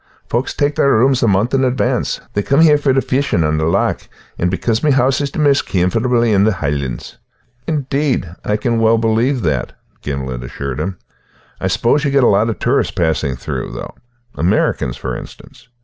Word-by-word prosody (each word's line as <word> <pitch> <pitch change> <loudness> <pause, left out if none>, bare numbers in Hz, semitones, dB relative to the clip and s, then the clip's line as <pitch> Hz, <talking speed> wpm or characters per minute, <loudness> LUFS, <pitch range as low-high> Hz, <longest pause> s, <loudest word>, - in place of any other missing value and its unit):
Folks 120 +3 -2
tak' 145 0 +1
their 140 - +2
rooms 130 +3 +3
a 120 - +3
month 100 +5 +1
in 135 -1 +2
advance; 130 0 0
they 105 - 0
come 140 +8 +2
here 150 -3 +5
for 145 -2 +2
the 130 0 +2
fishin' 130 -10 0
on 75 0 0
the 80 - 0
loch, 85 - 0 0.3
and 90 - +1
because 110 +5 -1
my 155 - +2
hoose 135 0 +2
is 140 - -1
the - - -9
maist 145 -2 +2
comfortable 115 +7 +1
in 105 -4 +3
the 110 0 +3
Hielands." 70 -6 -4 0.5
"Indeed, 140 - -1 0.2
I 105 - 0
can 115 +1 0
well 115 0 +4
believe 115 +3 +1
that," 75 -7 -1 0.3
Gimblet 65 -3 -4
assured 65 +1 -5
him. 95 -1 -3 0.6
"I - - -1
suppose 140 +5 +1
you 145 - +1
get 140 -1 +3
a - - +5
lot 105 +1 +3
of 110 - -3
tourists - - +1
passing 80 -5 0
through, - - -5
though, - - -7 0.4
Americans, 80 -7 0
for - - -4
instance?" - - -12
115 Hz, 195 wpm, -17 LUFS, 85-135 Hz, 0.6 s, here